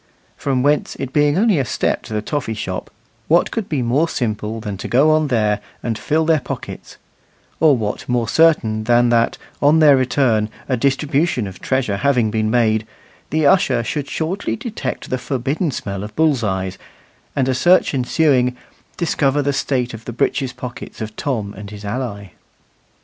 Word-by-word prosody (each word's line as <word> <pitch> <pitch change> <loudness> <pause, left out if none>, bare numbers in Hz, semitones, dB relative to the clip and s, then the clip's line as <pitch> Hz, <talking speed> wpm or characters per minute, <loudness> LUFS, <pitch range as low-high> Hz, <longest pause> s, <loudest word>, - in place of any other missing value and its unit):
From 130 -3 -1
whence 145 +1 +1
it 135 -1 -6
being 145 +1 +3
only 205 -5 +3
a - - +2
step 120 - -1
to - - -7
the 105 - -1
toffy 130 -4 -2
shop, 95 -3 -4 0.4
what 170 +2 +3
could 225 -4 -3
be 140 -5 0
more 140 +8 +1
simple 110 -2 -2
than 105 -2 -5
to - - -6
go 140 +6 +4
on 155 -1 +3
there 105 -5 +1 0.2
and 115 -2 -1
fill 155 +9 0
their 160 -1 +3
pockets; 125 - -7 0.6
or 150 -4 +5
what 105 +1 -4
more 120 -2 +1
certain 115 -8 +3
than 120 +1 +4
that 115 -1 +2 0.2
on 145 +3 +5
their 150 -3 +7
return, 125 -4 +1 0.2
a 130 - +1
distribution 140 0 +1
of 95 -2 -8
treasure 130 -7 0
having 120 -2 +2
been 110 0 0
made, 110 -2 +2 0.4
the 155 0 +1
usher 140 -9 +3
should 140 +4 -3
shortly 175 +5 -2
detect 220 - -5
the 130 - 0
forbidden 135 +6 -1
smell 100 -6 -4
of 105 - -8
bull's 155 -6 +2
eyes, 95 -2 -2 0.6
and, 135 -2 +1
a 130 - +2
search 175 +7 +4
ensuing, 125 -1 +2 0.4
discover 145 -4 +1
the 140 0 0
state 125 -3 -1
of 115 0 -9
the 120 - -5
breeches 130 +3 0
pockets 125 -1 -8
of 110 -1 -6
Tom 110 -8 -3
and 100 +1 -9
his 105 0 -9
ally? 100 -3 -4
125 Hz, 175 wpm, -19 LUFS, 110-145 Hz, 0.6 s, their